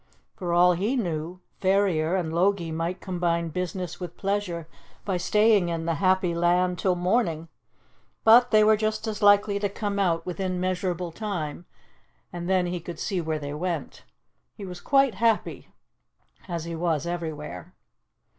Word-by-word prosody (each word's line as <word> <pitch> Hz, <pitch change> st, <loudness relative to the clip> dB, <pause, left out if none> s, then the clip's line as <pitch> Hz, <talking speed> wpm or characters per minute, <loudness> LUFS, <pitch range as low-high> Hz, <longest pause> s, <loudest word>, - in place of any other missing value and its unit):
For 175 Hz, -2 st, -4 dB
all 175 Hz, +1 st, +5 dB
he 205 Hz, +9 st, -1 dB
knew, 175 Hz, -5 st, -3 dB, 0.2 s
Ferrier 190 Hz, -4 st, +2 dB
and 165 Hz, -4 st, -2 dB
Logie 175 Hz, -1 st, +1 dB
might 165 Hz, +3 st, -3 dB
combine 170 Hz, -3 st, -1 dB
business 180 Hz, +1 st, -4 dB
with 175 Hz, -2 st, -7 dB
pleasure 195 Hz, -5 st, -2 dB, 0.4 s
by 190 Hz, -3 st, 0 dB
staying 210 Hz, 0 st, +3 dB
in 165 Hz, -1 st, -3 dB
'The 165 Hz, -, +1 dB
Happy 185 Hz, +1 st, +2 dB
Land' 175 Hz, +1 st, +1 dB
till 185 Hz, -2 st, +1 dB
morning; 175 Hz, -3 st, 0 dB, 0.7 s
but 240 Hz, +2 st, +7 dB
they 215 Hz, -1 st, +5 dB
were 215 Hz, 0 st, +5 dB
just 215 Hz, +1 st, -2 dB
as 215 Hz, -2 st, -4 dB
likely 205 Hz, 0 st, +4 dB
to 205 Hz, 0 st, -1 dB
come 200 Hz, 0 st, -3 dB
out 170 Hz, -4 st, +1 dB
within 185 Hz, 0 st, -3 dB
measurable 180 Hz, -1 st, -2 dB
time, 175 Hz, -5 st, -5 dB, 0.7 s
and 175 Hz, 0 st, -5 dB
then 185 Hz, -1 st, +3 dB
he 175 Hz, 0 st, -3 dB
could 170 Hz, 0 st, -8 dB
see 185 Hz, 0 st, -2 dB
where 160 Hz, -1 st, -2 dB
they 145 Hz, -1 st, -5 dB
went. 165 Hz, -1 st, -4 dB, 0.5 s
He 200 Hz, -, -8 dB
was 180 Hz, -1 st, -8 dB
quite 275 Hz, -3 st, +3 dB
happy, 225 Hz, +2 st, 0 dB, 0.8 s
as 170 Hz, -3 st, -3 dB
he 170 Hz, 0 st, -5 dB
was 165 Hz, -2 st, -1 dB
everywhere. 155 Hz, -, -5 dB
180 Hz, 155 wpm, -26 LUFS, 170-200 Hz, 0.8 s, but